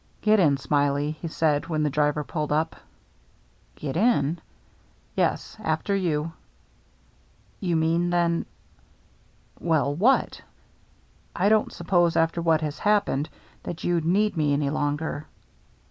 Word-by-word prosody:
" -, -, -35 dB
Get 215 Hz, 0 st, +4 dB
in. 145 Hz, -6 st, +4 dB
Smiley," 145 Hz, +1 st, 0 dB
he 170 Hz, -, -3 dB
said, 155 Hz, -1 st, 0 dB
when 155 Hz, -2 st, -1 dB
the 150 Hz, -, +2 dB
driver 150 Hz, +1 st, +1 dB
pulled 150 Hz, -1 st, -3 dB
up. 155 Hz, +2 st, 0 dB, 1.0 s
"Get 140 Hz, -1 st, -5 dB
in?" 175 Hz, -, +2 dB, 0.7 s
"Yes -, -, -1 dB
— -, -, -12 dB
after 180 Hz, +3 st, 0 dB
you." 165 Hz, -4 st, -1 dB, 1.3 s
"You 175 Hz, -5 st, -1 dB
mean, 165 Hz, +2 st, +1 dB
then 170 Hz, -1 st, +1 dB, 0.3 s
— -, -, -34 dB
" -, -, -32 dB
"Well, 145 Hz, -3 st, +2 dB
what?" 220 Hz, -, +2 dB, 0.5 s
" -, -, -35 dB
I 195 Hz, +3 st, +2 dB
didn't 215 Hz, 0 st, +2 dB
suppose 175 Hz, -3 st, +1 dB
after 165 Hz, +1 st, +1 dB
what 165 Hz, -2 st, +2 dB
has 150 Hz, -1 st, -4 dB
happened 205 Hz, -9 st, +1 dB, 0.3 s
that 170 Hz, -, -7 dB
you'd 175 Hz, -2 st, +1 dB
need 200 Hz, +4 st, +2 dB
me 150 Hz, -2 st, +2 dB
any 140 Hz, -1 st, 0 dB
longer." 150 Hz, +1 st, -2 dB
160 Hz, 145 wpm, -25 LUFS, 150-175 Hz, 1.3 s, Get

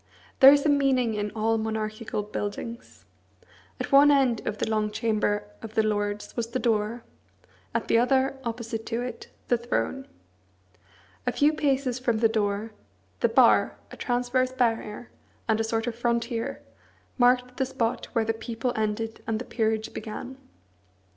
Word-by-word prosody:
There 270 Hz, +1 st, +11 dB
is 285 Hz, +1 st, +3 dB
a -, -, +4 dB
meaning 265 Hz, -5 st, +2 dB
in 210 Hz, 0 st, -2 dB
all 225 Hz, +1 st, +1 dB
monarchical 220 Hz, 0 st, -3 dB
buildings. 210 Hz, +3 st, -6 dB, 0.7 s
At -, -, -4 dB
one 280 Hz, +1 st, +8 dB
end 265 Hz, -5 st, +3 dB
of 210 Hz, -, -2 dB
the -, -, -1 dB
long 215 Hz, -1 st, 0 dB
chamber 210 Hz, -1 st, 0 dB, 0.2 s
of 225 Hz, 0 st, -9 dB
the 220 Hz, -, +4 dB
Lords 205 Hz, -1 st, -2 dB
was 235 Hz, -2 st, -2 dB
the 235 Hz, -, -3 dB
door; 230 Hz, -1 st, 0 dB, 0.7 s
at -, -, -1 dB
the 230 Hz, -, +4 dB
other, 265 Hz, +2 st, +2 dB
opposite 230 Hz, -1 st, -4 dB
to 235 Hz, +2 st, -2 dB
it, 250 Hz, -, -7 dB, 0.2 s
the 245 Hz, -, +3 dB
throne. 265 Hz, +3 st, -2 dB, 1.2 s
A -, -, +3 dB
few 295 Hz, +2 st, +3 dB
paces 270 Hz, -4 st, 0 dB
from 240 Hz, -3 st, 0 dB
the 225 Hz, +1 st, +4 dB
door, 215 Hz, 0 st, -1 dB, 0.5 s
the -, -, +3 dB
bar, -, -, +4 dB
a -, -, -8 dB
transverse 250 Hz, +1 st, 0 dB
barrier, 230 Hz, -2 st, -1 dB, 0.4 s
and 220 Hz, -1 st, +2 dB
a -, -, +2 dB
sort 225 Hz, 0 st, -1 dB
of 240 Hz, -, -2 dB
frontier, 235 Hz, 0 st, -2 dB, 0.6 s
marked 250 Hz, 0 st, +3 dB
the 265 Hz, -, +1 dB
spot 230 Hz, -3 st, -2 dB
where 230 Hz, -2 st, +1 dB
the 225 Hz, -, +1 dB
people 230 Hz, +2 st, -3 dB
ended 220 Hz, +1 st, -2 dB
and 225 Hz, -1 st, 0 dB
the 245 Hz, -, -6 dB
peerage 220 Hz, -2 st, -1 dB
began. 220 Hz, +4 st, -6 dB
230 Hz, 160 wpm, -26 LUFS, 220-250 Hz, 1.2 s, There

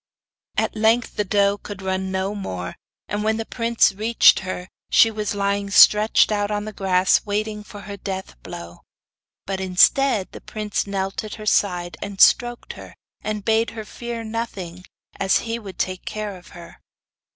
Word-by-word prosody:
At -, -, 0 dB
length 225 Hz, +2 st, +2 dB
the 210 Hz, -, 0 dB
doe 200 Hz, 0 st, +2 dB
could 200 Hz, -2 st, -9 dB
run 190 Hz, 0 st, -2 dB
no 190 Hz, +1 st, -2 dB
more, 90 Hz, -, -5 dB, 0.3 s
and 205 Hz, +1 st, -2 dB
when 220 Hz, 0 st, +1 dB
the 225 Hz, -, -3 dB
prince 230 Hz, -2 st, +2 dB
reached 220 Hz, +4 st, +4 dB
her, 185 Hz, -1 st, -5 dB, 0.2 s
she 225 Hz, -, +5 dB
was 210 Hz, -1 st, -3 dB
lying 200 Hz, 0 st, -1 dB
stretched 210 Hz, +2 st, +6 dB
out 205 Hz, -1 st, 0 dB
on 210 Hz, 0 st, -2 dB
the 215 Hz, -, -7 dB
grass, 185 Hz, -1 st, +2 dB
waiting 210 Hz, 0 st, -3 dB
for 205 Hz, -1 st, -11 dB
her 200 Hz, 0 st, -8 dB
death 190 Hz, -1 st, -6 dB
blow. 85 Hz, +6 st, -9 dB, 0.7 s
But 195 Hz, -1 st, -3 dB
instead 190 Hz, +4 st, +3 dB
the -, -, -10 dB
prince 210 Hz, -1 st, -3 dB
knelt 195 Hz, 0 st, -3 dB
at 215 Hz, -, -7 dB
her 215 Hz, -, -9 dB
side, 180 Hz, -4 st, +1 dB
and 200 Hz, -1 st, -6 dB
stroked 240 Hz, -1 st, +4 dB
her, -, -, -12 dB, 0.3 s
and 210 Hz, -1 st, -4 dB
bade 225 Hz, +1 st, +2 dB
her 220 Hz, -, -5 dB
fear 235 Hz, +1 st, -6 dB
nothing, 195 Hz, -6 st, -5 dB, 0.3 s
as 190 Hz, -1 st, +2 dB
he 230 Hz, 0 st, -3 dB
would 195 Hz, -5 st, -10 dB
take 185 Hz, -1 st, -2 dB
care 210 Hz, -2 st, -5 dB
of 180 Hz, -1 st, -15 dB
her. 170 Hz, -1 st, -13 dB
205 Hz, 175 wpm, -22 LUFS, 190-220 Hz, 0.7 s, stretched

